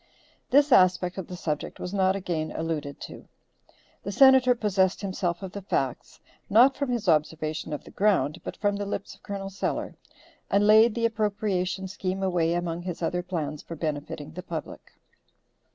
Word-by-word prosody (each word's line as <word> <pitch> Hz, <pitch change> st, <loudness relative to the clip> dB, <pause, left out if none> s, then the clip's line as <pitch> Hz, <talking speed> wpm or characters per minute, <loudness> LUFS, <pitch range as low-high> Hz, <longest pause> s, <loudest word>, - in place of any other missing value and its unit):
This 285 Hz, +2 st, +4 dB
aspect 185 Hz, -2 st, +4 dB
of 185 Hz, -, -6 dB
the 180 Hz, -, -7 dB
subject 155 Hz, -4 st, -4 dB
was 180 Hz, -, -5 dB
not 190 Hz, -1 st, +2 dB
again 170 Hz, -5 st, -3 dB
alluded 155 Hz, -3 st, -3 dB
to. -, -, -9 dB, 0.7 s
The 200 Hz, -, -5 dB
Senator 265 Hz, +1 st, +6 dB
possessed 195 Hz, -4 st, +1 dB
himself 185 Hz, -2 st, -2 dB
of 190 Hz, -, -6 dB
the 200 Hz, -, -7 dB
facts, 135 Hz, -9 st, -3 dB, 0.3 s
not 245 Hz, +6 st, +6 dB
from 280 Hz, -1 st, -2 dB
his 235 Hz, -4 st, -2 dB
observation 155 Hz, -1 st, 0 dB
of 150 Hz, -, -4 dB
the -, -, -13 dB
ground, 195 Hz, -7 st, +1 dB
but -, -, -6 dB
from 205 Hz, -1 st, 0 dB
the 205 Hz, 0 st, -4 dB
lips 200 Hz, -1 st, -4 dB
of -, -, -20 dB
Col. 195 Hz, -1 st, -6 dB
Sellers, 195 Hz, -, -3 dB, 0.6 s
and 200 Hz, +1 st, +3 dB
laid 220 Hz, +1 st, +6 dB
the 230 Hz, -1 st, 0 dB
appropriation 205 Hz, -4 st, -1 dB
scheme 190 Hz, 0 st, -3 dB
away 170 Hz, -3 st, +1 dB
among 175 Hz, -1 st, -2 dB
his 175 Hz, -1 st, -5 dB
other 175 Hz, +2 st, 0 dB
plans 155 Hz, -5 st, -4 dB
for 165 Hz, -, -8 dB
benefiting 150 Hz, -1 st, -4 dB
the 180 Hz, -, -7 dB
public. 165 Hz, -2 st, -7 dB
185 Hz, 170 wpm, -26 LUFS, 165-205 Hz, 0.7 s, Senator